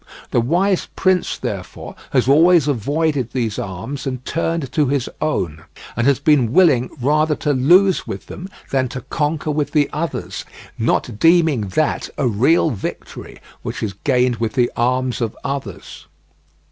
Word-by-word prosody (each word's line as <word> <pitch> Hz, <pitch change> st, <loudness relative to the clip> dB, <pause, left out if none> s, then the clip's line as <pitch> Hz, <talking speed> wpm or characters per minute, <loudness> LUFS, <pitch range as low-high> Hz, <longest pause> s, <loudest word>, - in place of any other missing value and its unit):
The 120 Hz, -, +3 dB
wise 180 Hz, +9 st, +1 dB
prince, 185 Hz, -1 st, +1 dB
therefore, -, -, -6 dB, 0.2 s
has 130 Hz, -2 st, +1 dB
always 160 Hz, +2 st, +5 dB
avoided 145 Hz, +1 st, -1 dB
these 115 Hz, -5 st, -2 dB
arms 100 Hz, +10 st, -5 dB
and 130 Hz, -1 st, -5 dB
turned 165 Hz, -3 st, -2 dB
to 150 Hz, -3 st, +1 dB
his 135 Hz, -2 st, 0 dB
own; 85 Hz, -, -2 dB, 0.3 s
and 120 Hz, +3 st, +1 dB
has 140 Hz, -2 st, +4 dB
been 140 Hz, -6 st, +2 dB
willing 145 Hz, -8 st, +4 dB
rather 150 Hz, +4 st, +2 dB
to 145 Hz, 0 st, -1 dB
lose 180 Hz, +9 st, +4 dB
with -, -, -6 dB
them 185 Hz, +2 st, -9 dB, 0.2 s
than 130 Hz, -1 st, +1 dB
to 125 Hz, +1 st, -6 dB
conquer 150 Hz, 0 st, -1 dB
with 150 Hz, -1 st, -2 dB
the 150 Hz, -2 st, +3 dB
others, 160 Hz, +2 st, -4 dB, 0.3 s
not 105 Hz, -, -1 dB
deeming 165 Hz, -, +3 dB
that 155 Hz, -1 st, 0 dB
a 135 Hz, -, +1 dB
real 135 Hz, +9 st, +3 dB
victory 105 Hz, -, -7 dB, 0.2 s
which -, -, -5 dB
is 105 Hz, -3 st, -2 dB
gained 125 Hz, -3 st, +2 dB
with 115 Hz, 0 st, -2 dB
the 125 Hz, -3 st, +1 dB
arms 125 Hz, +1 st, 0 dB
of 115 Hz, -2 st, -2 dB
others. 140 Hz, -1 st, -6 dB
140 Hz, 155 wpm, -19 LUFS, 125-160 Hz, 0.3 s, always